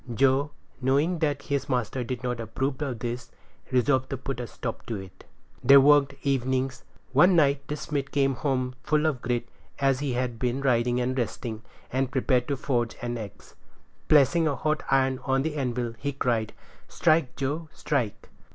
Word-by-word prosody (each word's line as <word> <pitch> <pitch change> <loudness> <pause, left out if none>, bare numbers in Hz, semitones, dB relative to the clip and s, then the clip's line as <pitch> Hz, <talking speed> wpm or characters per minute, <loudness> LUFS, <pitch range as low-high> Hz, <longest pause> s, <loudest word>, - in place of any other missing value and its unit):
Joe, 135 +4 +3 0.3
knowing 145 +7 +2
that 145 -3 0
his 140 0 -2
master 125 0 -1
did 125 +1 -5
not 125 -1 -2
approve 130 +5 -3
of 135 -5 -2
this, 120 +1 -5 0.4
resolved 130 +1 +2
to 135 - -3
put 135 0 -5
a 120 - -4
stop 115 0 -6
to 115 - -2
it. 95 -2 -10 0.4
They 140 +3 +8
worked 140 0 +5
evenings. 130 -1 0 0.3
One 175 +7 +6
night 140 -3 +3
the 150 - -2
smith 140 -2 -3
came 135 -1 +2
home 130 -1 -1
full 150 +3 +1
of 145 -6 0
grit, 120 -1 -1 0.3
as 135 -2 +2
he 140 -3 -1
had 120 -2 -2
been 125 +2 -1
riding 125 -2 +2
and 125 +1 -1
resting, 115 -2 -3 0.3
and 130 0 +1
prepared 125 -1 +1
to 140 - -1
forge 120 -4 -1
an 120 0 -2
axe. 100 -2 -10 0.5
Placing 155 +3 +5
a 145 - 0
hot 155 +4 0
iron 130 -1 +2
on 135 0 +1
the 160 0 -2
anvil, 125 -4 -2
he 140 0 -2
cried, 115 -5 0 0.3
"Strike, 155 -5 +2
Joe, 150 +4 -3
strike." 125 -9 -2
130 Hz, 175 wpm, -27 LUFS, 125-140 Hz, 0.5 s, They